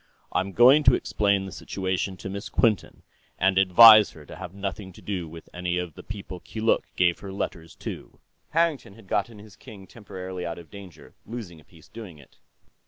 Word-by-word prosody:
I'm 95 +2 -1
going 130 - +7
to 130 -1 +7
explain 100 -2 0
the 95 - -8
situation 95 +1 -3
to 95 - -7
Miss 100 +3 -6
Quinton, 110 -4 0 0.3
and 95 0 +3
advise 105 +3 +8
her 75 -2 -14
to - - -11
have - - -8
nothing 100 0 -6
to - - -15
do 90 -5 -4
with 80 0 -12
any 90 0 -2
of 90 -3 -4
the - - -11
people 100 -4 -8
Keeluk 110 +5 -1
gave 90 -1 +2
her 100 - -8
letters 85 -4 -5
to." - - -9 0.3
Harrington 160 -11 0
had 115 -2 -16
gotten 105 +3 -2
his 105 -1 -14
king 100 -3 -13
temporarily 95 -4 -8
out 85 -1 -5
of 85 -2 -13
danger, 100 -5 -13
losing 110 -8 -8
a - - -19
piece 80 0 -20
doing 110 -8 -11
it. 70 - -20
95 Hz, 190 wpm, -25 LUFS, 90-110 Hz, 0.3 s, advise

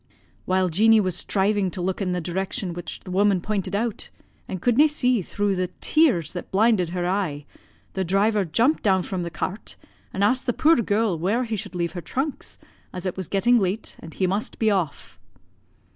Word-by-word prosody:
"While 185 0 +1
Jeanie 220 +6 +5
was 185 -4 0
striving 200 +1 +1
to 185 - -8
look 185 +3 -2
in 185 -2 -1
the 180 - -1
direction 180 +1 -3
which 175 +1 -7
the 185 - -9
woman 200 0 +3
pointed 200 +1 -2
out, 225 +1 -2 0.4
and 185 - -5
could 240 +5 +2
na' 300 +5 +6
see 255 -6 +1
through 200 +2 -1
the 180 -1 -1
tears 255 - +2
that 180 - -6
blinded 200 -3 +3
her 180 0 -3
e'e, 175 -6 -1 0.5
the 190 - -1
driver 200 +3 +2
jumped 230 - +2
down 190 -3 +2
from 185 0 -3
the 170 - -3
cart, 185 +5 -4 0.4
and 195 - -1
asked 250 +6 +2
the 245 - +2
puir 320 +6 +4
girl 210 -5 +1
where 205 +9 +1
he 225 -2 -3
should 205 -2 -6
leave 170 -1 -1
her 175 - -6
trunks, 265 - -4 0.3
as 180 0 -7
it 185 - -2
was 185 -3 -5
getting 235 +5 +3
late, 195 +2 -2
and 165 -1 -11
he 190 - +1
must 195 +4 -1
be 220 -2 +2
off? 180 -7 -3
195 Hz, 200 wpm, -24 LUFS, 180-220 Hz, 0.5 s, na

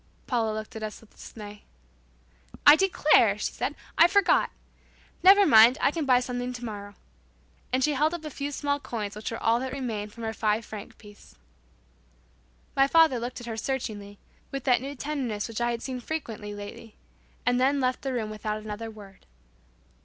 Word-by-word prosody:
Paula 230 -4 0
looked 215 +3 -7
at 220 - -6
us 215 -1 -5
all - - -18
with - - -28
dismay. 210 -2 -10 1.0
"I 290 - +10
declare," 305 - +4
she - - -2
said, - - -3 0.2
"I 335 - +9
forgot! 395 +1 +3 0.7
Never 390 +3 +7
mind, 230 -2 +7
I - - +3
can 310 -3 -3
buy 250 -1 +5
something 250 0 -4
tomorrow." 210 -4 -7 0.8
And 260 +1 +1
she 300 - +3
held 305 +5 +1
up 325 -2 -8
a 305 - -5
few 280 +2 -4
small 285 0 -1
coins 210 -7 -5
which 210 - -5
was 230 - -5
all 230 +1 +3
that 260 +1 -4
remained 225 -6 -4
of - - -20
her 225 -1 -4
five 215 +1 0
franc 210 -2 -9
piece. 205 - -16 1.4
My 270 0 +4
father 320 -4 +4
looked 245 +1 -5
at - - -9
her 225 -2 -5
searchingly, 210 -5 -4 0.3
with 275 -1 -5
that 250 -3 +3
new 280 +2 -6
tenderness 260 -7 -3
which 230 0 -5
I 240 - +1
had 235 -1 -3
seen 255 -2 -4
frequently 230 -7 -5
lately, 205 +2 -10 0.5
and 245 0 +2
then 275 +2 +3
left 255 -1 0
the 270 - -3
room 225 -4 -3
without 215 0 -3
another 215 +1 -6
word. 200 - -14
240 Hz, 185 wpm, -27 LUFS, 215-275 Hz, 1.4 s, I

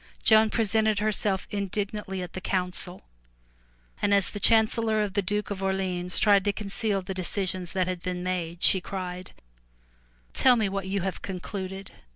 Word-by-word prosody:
Joan 220 0 +6
presented, 220 -1 +2
herself 205 -2 0
indignantly 200 -1 -3
at 180 - -9
the 185 - -6
council, 180 -1 -3 1.0
and 205 0 +3
as 200 - +2
the 205 - -5
chancellor 220 0 +3
of 200 -2 -4
the 200 - +1
Duke 205 +2 -3
of 195 -1 -4
Orleans 185 -2 -2
tried 200 -2 +4
to 205 - +3
conceal 200 -1 -2
the 190 +1 -5
decisions 185 -1 -2
which 185 -1 +2
had 180 -1 -4
been 180 0 -4
made, 175 -2 -3
she 190 - +6
cried, 185 -1 -6 1.0
"Tell 255 -1 +5
me 220 -3 +1
what 195 -1 -3
you 195 0 -1
have 190 +1 -4
concluded. 190 +1 -6
195 Hz, 165 wpm, -27 LUFS, 185-210 Hz, 1.0 s, Joan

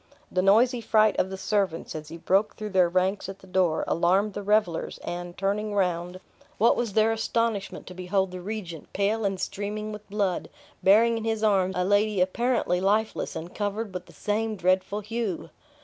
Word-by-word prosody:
The 185 - +1
noisy 235 +6 +4
fright 215 -1 +3
of 185 - +1
the 190 - -5
servants, 195 -4 -1
as 155 -1 -7
he 165 - -8
broke 195 +5 +1
through 215 -1 -6
their 185 -2 +4
ranks 185 +2 0
at 195 - -7
the - - -17
door, 180 -3 +1
alarmed 190 +5 +2
the 205 - -4
revelers; 205 -4 +1
and 175 0 -5
turning 205 +2 -1
round, 180 -1 -1 0.4
what 230 +3 +4
was 235 -4 -2
their 220 +2 +4
astonishment 225 -2 -1
to 180 - -9
behold 185 +1 -1
the 180 0 -7
regent, 180 -5 -6
pale 210 +3 0
and 195 -1 -1
streaming 210 +3 -4
with 210 -1 -9
blood, 200 -3 -1 0.3
bearing 225 +4 +5
in - - -6
his 220 -1 -1
arms 190 -3 +2
a 180 - +1
lady 205 +1 +2
apparently 185 -1 +1
lifeless, 210 +3 0
and 170 +2 -6
covered 205 0 -3
with 180 - -6
the - - -16
same 215 +1 -1
dreadful 185 +2 +1
hue! 210 -7 -4
200 Hz, 185 wpm, -26 LUFS, 185-215 Hz, 0.4 s, bearing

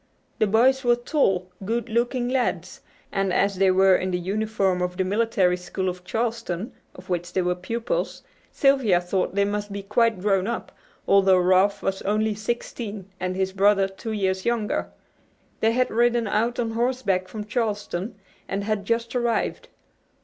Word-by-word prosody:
The 215 - +3
boys 255 +6 +3
were 240 -1 +4
tall, 195 - 0
good 230 +5 -2
looking 240 +2 0
lads, 240 -9 -1 0.3
and 195 -1 0
as 195 +1 +1
they 195 0 +4
were 190 0 +5
in 185 - -1
the 180 - 0
uniform 195 0 0
of 180 0 -2
the 190 - +2
Military 200 -2 +2
School 180 +1 -4
of 180 0 -7
Charleston, 225 -2 -3 0.2
of 180 +1 -13
which 175 -1 -2
they 185 - +1
were 180 0 +1
pupils, 230 - -3 0.3
Sylvia 270 -10 +3
thought 180 +1 -2
they 200 0 +3
must 205 0 -3
be 200 0 -5
quite 220 0 +2
grown 195 0 +1
up, 235 - -4 0.4
although 195 -1 +5
Ralph 185 +2 +3
was 195 0 -1
only 215 +2 +1
sixteen 210 -2 -5
and 185 0 -2
his 190 0 -1
brother 195 0 +4
two 195 +4 -7
years 190 -3 -1
younger. 235 -3 -1 0.7
They 225 +1 +2
had 255 +1 +1
ridden 235 +1 +2
out 230 +4 0
on 230 -2 -1
horseback 230 -6 0
from 210 +3 -6
Charleston, 210 -3 -2 0.3
and 195 +1 -2
had 210 -1 -2
just 230 +2 -1
arrived. 240 -2 -1
205 Hz, 165 wpm, -24 LUFS, 185-230 Hz, 0.7 s, were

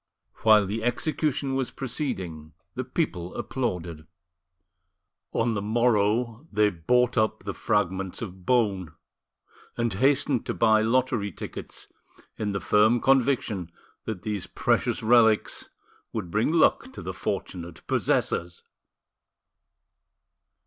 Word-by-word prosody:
While 110 -2 +5
the 110 +3 -3
execution 140 +2 0
was 135 -2 -1
proceeding 95 - -5 0.2
the 130 - -3
people 110 - -3
applauded. 85 -11 -3 1.2
On 115 0 +1
the 100 - -2
morrow 115 +3 +1
they 105 -1 +3
bought 125 +9 +2
up 110 -2 0
the 100 0 -4
fragments 95 -2 -1
of 95 -5 -7
bone, 95 -8 +1 0.8
and 115 -3 0
hastened 135 +3 +2
to - - -2
buy 110 -2 +4
lottery 115 -2 +1
tickets, - - -8 0.5
in 105 -1 -2
the 100 - -2
firm 110 +5 +4
conviction 120 -9 +1 0.3
that 110 -6 -5
these 105 -3 -3
precious - - 0
relics 110 -1 +3 0.4
would 95 -7 -4
bring 110 - +1
luck 170 +10 +3
to - - -8
the - - -4
fortunate - - -5
possessors! 465 - 0
110 Hz, 115 wpm, -26 LUFS, 100-125 Hz, 1.2 s, While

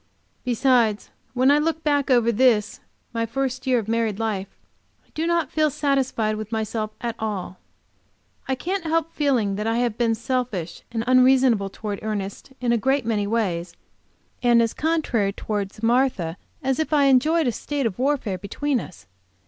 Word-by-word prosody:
Besides, 240 -3 +2 0.2
when 255 +2 +4
I 290 - +5
look 320 +1 -1
back 285 -2 +1
over 240 -2 +4
this 225 -3 +2 0.3
my 230 0 -1
first 260 +2 -3
year 255 -1 +4
of 220 -3 -2
married 225 -2 0
life, 210 -4 -2 0.6
I - - -34
do 320 +2 -1
not 340 -4 +1
feel 310 -1 +2
satisfied 265 -7 0
with 215 0 -6
myself 220 -1 -2
at 235 -1 -2
all. 200 -4 -4 0.9
I 265 - 0
can't 365 +8 -3
help 330 0 0
feeling 240 -9 +1
that 210 +1 -2
I 225 +1 +1
have 240 -2 -1
been 230 -1 +2
selfish 230 - -3
and 225 -1 -2
unreasonable 255 -5 +4
towards 205 0 -5
Ernest 205 +2 -4
in 245 -1 0
a 235 - +2
great 265 +2 +1
many 210 -3 0
ways, 180 -6 -1 0.7
and 240 -1 +5
as 230 -1 +2
contrary 280 -11 0
towards 205 0 -4
Martha 230 -9 +1 0.3
as 265 +1 0
if 315 - -1
I 295 -2 +4
enjoyed 300 +5 +4
a 245 - +2
state 285 +3 -3
of 215 -3 -2
warfare 255 -8 0
between 265 +8 -1
us. 185 - -10
240 Hz, 170 wpm, -23 LUFS, 215-270 Hz, 0.9 s, I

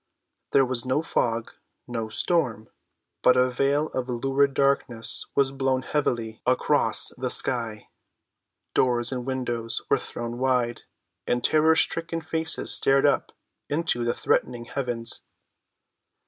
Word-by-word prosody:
There 135 - +5
was 125 -2 -1
no 130 +4 0
fog, 115 -7 -1 0.4
no 115 -2 -4
storm, 115 - -1 0.5
but 125 0 +5
a 125 0 +3
veil 140 +4 +1
of 130 0 -4
lurid 135 +3 +1
darkness 135 -4 0
was 135 -1 +3
drawn 135 -1 0
heavily 120 -7 -2
across 125 0 +2
the - - -1
sky. 115 -4 0 0.9
Doors 120 -1 +1
and 125 -1 -4
windows 120 -3 -2
were - - +4
thrown 120 0 -6
wide, 125 -3 +1 0.5
and 120 0 0
terror‐stricken 160 +1 +2
faces 160 0 +1
stared 135 0 +3
up - - +2 0.4
into 145 -5 +1
the 120 0 0
threatening 120 -1 0
heavens. 120 -3 -3
125 Hz, 120 wpm, -25 LUFS, 120-140 Hz, 0.9 s, There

